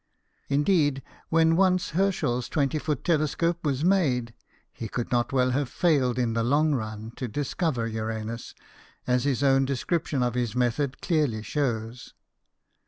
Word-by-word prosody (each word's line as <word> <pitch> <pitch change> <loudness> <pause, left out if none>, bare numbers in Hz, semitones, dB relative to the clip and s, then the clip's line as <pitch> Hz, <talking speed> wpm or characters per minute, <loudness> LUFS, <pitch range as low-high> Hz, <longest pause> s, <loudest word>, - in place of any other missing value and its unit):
Indeed, 145 -2 +2 0.3
when 165 0 +4
once 185 0 +2
Herschel's 155 -9 0
twenty 145 0 0
foot 150 -1 -2
telescope 165 +1 0
was 145 0 0
made, 135 -12 +2 0.4
he 115 - -6
could 120 +2 -4
not 120 -1 +1
well 130 -1 +2
have 135 0 -1
failed 135 -7 +2
in 120 -3 0
the 115 - 0
long 145 +5 +2
run 110 -3 -4
to 130 - -3
discover 140 - -1
Uranus, 110 +1 -5 0.5
as 125 +1 +1
his 140 -1 0
own 135 -1 +4
description 140 +1 -1
of 120 -1 0
his 120 -2 -2
method 125 +2 -1
clearly 145 - 0
shows. 120 -2 -3
135 Hz, 145 wpm, -26 LUFS, 120-155 Hz, 0.5 s, when